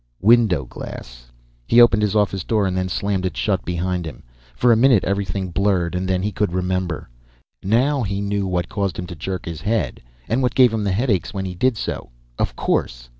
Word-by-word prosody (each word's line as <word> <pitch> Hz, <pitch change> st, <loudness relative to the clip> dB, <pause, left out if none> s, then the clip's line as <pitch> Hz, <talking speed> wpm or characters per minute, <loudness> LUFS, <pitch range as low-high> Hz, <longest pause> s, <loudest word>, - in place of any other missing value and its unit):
Window 105 Hz, -, +4 dB
glass. -, -, -9 dB, 0.4 s
He 120 Hz, -, +5 dB
opened 115 Hz, -3 st, +6 dB
his 105 Hz, 0 st, 0 dB
office 100 Hz, -3 st, +1 dB
door 110 Hz, -3 st, +1 dB
and 95 Hz, -1 st, -1 dB
then 95 Hz, 0 st, -1 dB
slammed 100 Hz, 0 st, -1 dB
it 95 Hz, -, -3 dB
shut 95 Hz, -4 st, 0 dB
behind 90 Hz, 0 st, -2 dB
him. 65 Hz, -7 st, -9 dB, 0.3 s
For 120 Hz, -, +3 dB
a -, -, +6 dB
minute 120 Hz, -3 st, +4 dB
everything 100 Hz, -1 st, -2 dB
blurred, 90 Hz, -2 st, +1 dB
and 90 Hz, +1 st, -2 dB
then 95 Hz, 0 st, 0 dB
he 105 Hz, -, -1 dB
could 105 Hz, -4 st, -1 dB
remember. 90 Hz, -2 st, -2 dB, 0.5 s
Now 130 Hz, +8 st, +2 dB
he 100 Hz, -3 st, -2 dB
knew 100 Hz, -1 st, -1 dB
what 90 Hz, -1 st, -1 dB
caused 100 Hz, -4 st, -2 dB
him 90 Hz, -, -4 dB
to 90 Hz, -1 st, -8 dB
jerk 90 Hz, +3 st, -5 dB
his 80 Hz, -2 st, -6 dB
head, 105 Hz, -, -1 dB, 0.3 s
what 125 Hz, +2 st, 0 dB
gave 125 Hz, -3 st, +5 dB
him 110 Hz, -2 st, -1 dB
the 100 Hz, -, +1 dB
headaches 100 Hz, -, 0 dB
when 95 Hz, -1 st, -2 dB
he 95 Hz, -, -4 dB
did 120 Hz, +6 st, +1 dB
so. -, -, -4 dB, 0.3 s
Of -, -, -1 dB
course. -, -, -1 dB
95 Hz, 205 wpm, -21 LUFS, 90-105 Hz, 0.5 s, opened